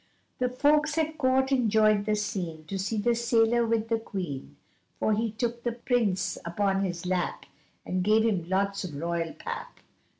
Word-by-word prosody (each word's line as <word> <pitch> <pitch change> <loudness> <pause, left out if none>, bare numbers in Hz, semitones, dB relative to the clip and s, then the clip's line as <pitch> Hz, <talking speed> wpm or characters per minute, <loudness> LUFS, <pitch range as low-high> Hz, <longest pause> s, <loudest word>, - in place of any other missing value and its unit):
The 250 0 +1
folks 295 +4 +2
at 315 -1 -1
Court 265 0 +2
enjoyed 215 -4 +3
the 215 - +2
scene, 180 -7 -3
To 195 +4 -4
see 205 +4 -1
the 235 +3 +2
sailor 235 0 +2
with 225 -1 +1
the 225 -1 +1
Queen, 150 - -6 0.4
For 215 - +2
he 225 +2 0
took 235 +2 -2
the 240 -1 -1
Prince 235 -5 0
upon 195 +3 0
his 175 -2 -3
lap, 180 -1 -1 0.4
And 185 0 -1
gave 215 +3 +4
him 185 -7 0
lots 200 +1 0
of 170 -6 -6
royal 165 +2 -2
pap. - - -7
215 Hz, 170 wpm, -28 LUFS, 185-235 Hz, 0.4 s, gave